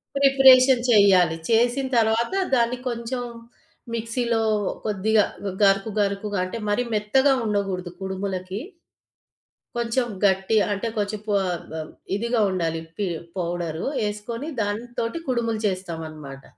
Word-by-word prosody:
Preparation 265 -2 +6
చెయ్యాలి. 190 -6 +5
చేసిన 245 +4 +2
తర్వాత 225 +6 +2 0.2
దాన్ని 240 0 +1
కొంచెం 240 +1 -4 0.7
మిక్సీలో 230 0 -1 0.4
కొద్దిగా 215 +1 +2 0.4
గరుకు, 195 +2 +3
గరుకుగా 200 0 -1
అంటే 185 - -5
మరీ 205 +4 +1
మెత్తగా 265 +7 +3
ఉండగూడదు 195 -4 -2
కుడుములకి. 190 0 -4 1.2
కొంచెం 235 +2 0 0.2
గట్టిగా 195 +2 +3
అంటే 200 +4 -3
కొంచెం 210 0 -1
పొ 210 - 0
ఆహ్, 160 -3 -5 0.3
ఇదిగా 235 +3 0
ఉండాలి 165 -3 -1 0.2
పి 205 -2 -1 0.3
పౌడరు. 170 -2 -3 0.2
ఏసుకొని 230 +6 -6
దాంతోటి 230 +6 -3
కుడుములు 235 -3 0
చేస్తామనమాట. 160 -7 -6
210 Hz, 105 wpm, -24 LUFS, 190-235 Hz, 1.2 s, Preparation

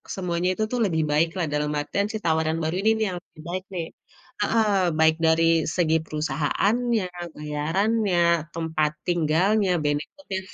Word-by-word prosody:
semuanya 180 -1 -1
itu 215 - -1
tuh 250 - -1
lebih 160 -4 0
baik 155 +3 +3 0.3
dalam 150 0 0
artian 200 +7 -1
si 220 - -3
tawaran 160 0 +1
baru 160 +3 -1
ini 220 - +4
nih 220 - +2
yang - - -4
lebih 155 - -16
baik 185 +1 -3
nih. 165 -2 -3 0.5
Heeh, 220 +1 +2 0.3
baik 160 0 +5
dari 160 +1 +4 0.3
segi 160 -3 +2
perusahaannya, 185 - 0 0.3
bayarannya, 175 +7 0 0.4
tempat 160 -2 0 0.2
tinggalnya, 180 +5 +2
benefitnya,. 190 - -3
170 Hz, 140 wpm, -24 LUFS, 155-200 Hz, 0.5 s, baik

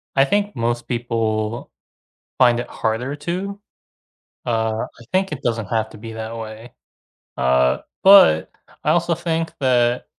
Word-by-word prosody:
I 135 0 +5
think 205 +7 0
most 120 0 -2
people 115 -2 -2 0.7
find 120 -2 +4
it 120 - -4
harder 120 +5 -2
to. 185 +6 -4 0.9
Uh, 110 -1 0 0.2
I - - -13
think 190 -1 +1
it 145 -2 -5
doesn't 115 -3 -1
have 110 +1 -1
to - - -12
be 115 +1 -8
that 110 +1 -6
way. 110 +1 -8 0.6
Uh, 65 0 +2 0.3
but 190 - +7 0.3
I - - +2
also 170 0 +2
think 165 -1 -2
that 125 -2 +2
120 Hz, 140 wpm, -21 LUFS, 110-155 Hz, 0.9 s, but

